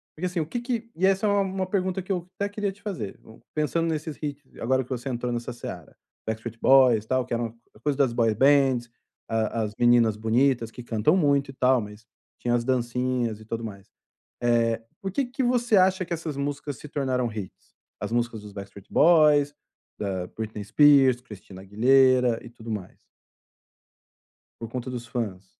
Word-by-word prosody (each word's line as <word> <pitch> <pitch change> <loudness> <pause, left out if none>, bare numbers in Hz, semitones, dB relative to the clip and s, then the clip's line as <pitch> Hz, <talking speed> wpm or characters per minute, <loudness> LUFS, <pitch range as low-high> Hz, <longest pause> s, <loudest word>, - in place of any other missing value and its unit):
porque 170 - -4
assim, 180 -1 -1
o 155 - 0
que 240 - -3
que 235 -2 -3
e 185 +3 +1
essa 195 +2 +3
é - - +3
uma 200 0 +3
uma 190 -1 -2
pergunta 185 -1 -1
que 185 - -6
eu 180 -2 -2
até 200 0 -1
queria 205 -1 -2
te 200 - -19
fazer, 180 - -5
hum, 110 - -16
pensando 165 +2 0
nesses 155 -1 -3
hits 145 -2 -7
agora 130 +2 +1
que 125 - -19
você 130 +1 -4
entrou 120 -1 -2
nessa 120 0 -4
seara, 90 -8 -8 0.3
Backstreet 110 +1 -5
Boys, 125 -5 +5
tal, 130 +2 +1
que - - -5
era 120 - -1
uma 115 0 -5 0.2
a 105 - -18
coisa 145 +2 -1
das 135 -4 +2
boy 115 -2 +2
bands, 135 -1 +3 0.4
a 115 0 0
as 105 -1 -4
meninas 120 -3 +4
bonitas, 115 +1 +1
que 125 - -9
cantam 115 - +2
muito 140 -5 +2
e - - -16
tal, 130 -1 +3
mas 105 +1 -10 0.4
tinham 120 0 +1
as 120 - 0
dancinhas 125 -2 -1
e 110 - -13
tudo 115 +1 -4
mais. 100 -2 -8 0.5
Eh, 115 -1 +2 0.2
porque 195 +8 -1
que 255 +2 -3
você 240 -3 +2
acha 185 0 +4
que 170 - -3
essas 160 -3 -5
músicas 145 0 -3
se 150 - -10
tornaram 130 -4 -1
hits? 105 -4 -9 0.3
As 105 +2 -4
músicas 120 -2 -1
dos 105 -1 -11
Backstreet 100 0 -10
Boys, 150 -3 +5 0.5
da 95 -3 -3
Britney 110 +1 -6
Spears, 135 +2 +5
Cristina 105 -5 -12
Aguilera 125 +3 +4
e - - -8
tudo 115 -1 -10
mais. 105 -4 -6 1.6
Por 115 - -6
conta 125 +2 -5
dos 120 -1 -6
fãs. 100 -6 -4
125 Hz, 190 wpm, -26 LUFS, 115-155 Hz, 1.6 s, Boys